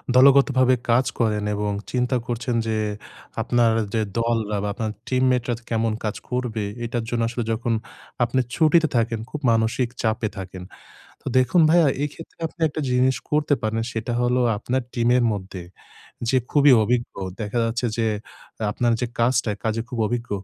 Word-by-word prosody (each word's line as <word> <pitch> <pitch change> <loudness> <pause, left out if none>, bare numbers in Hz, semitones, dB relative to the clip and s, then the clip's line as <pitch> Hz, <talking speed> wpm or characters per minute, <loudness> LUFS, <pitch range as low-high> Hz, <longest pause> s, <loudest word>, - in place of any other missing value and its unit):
দলগতভাবে 130 -1 +6
কাজ 120 +3 +4
করেন। 105 -3 +1
এবং 105 0 -1 0.2
চিন্তা 125 +1 0
করছেন 120 0 -2
যে 110 - 0 0.7
আপনার 120 -1 +3 0.2
যে 110 - +1 0.2
দল 115 0 +1 0.2
বা, - - -1
আপনার 110 +1 -3 0.2
team 130 0 +1
mate 125 -1 0
রা - - +2 0.2
কেমন 115 -1 0
কাজ 105 -1 -2
করবে, 125 -4 -2 0.2
এটার 120 0 -2
জন্য 120 -1 -1
আসলে 120 0 -3
যখন 115 +1 -1 0.5
আপনি 120 +2 +1 0.2
ছুটিতে 160 0 +4
থাকেন, 115 -1 +1
খুব 150 - -5
মানসিক 115 +2 +1
চাপে 110 0 0
থাকেন। 95 -1 -7 0.6
তো - - -32
দেখুন 130 +7 +4
ভাইয়া, 170 -2 +5 0.2
এক্ষেত্রে 150 +3 -9
আপনি 165 - -13
একটা 150 +1 -4
জিনিস 125 +1 +3
করতে 150 -1 +2
পারেন, 110 +1 -1
সেটা 115 +1 -3
হলো 125 +1 +2 0.2
আপনার 125 +5 -1
টিমের 120 +1 +2
মধ্যে 95 -2 -6 0.7
যে 130 - +3
খুবই 145 -1 +6
অভিজ্ঞ। 120 +2 0 0.3
দেখা 110 +2 -2
যাচ্ছে 120 +2 -1
যে, 115 -1 +1 0.6
আপনার 120 +3 +1
যে 125 - 0
কাজটা 120 0 +2
এ - - -13
কাজে 110 0 0
খুব 125 -2 -6
অভিজ্ঞ। 120 +1 -3
120 Hz, 165 wpm, -23 LUFS, 115-130 Hz, 0.7 s, দলগতভাবে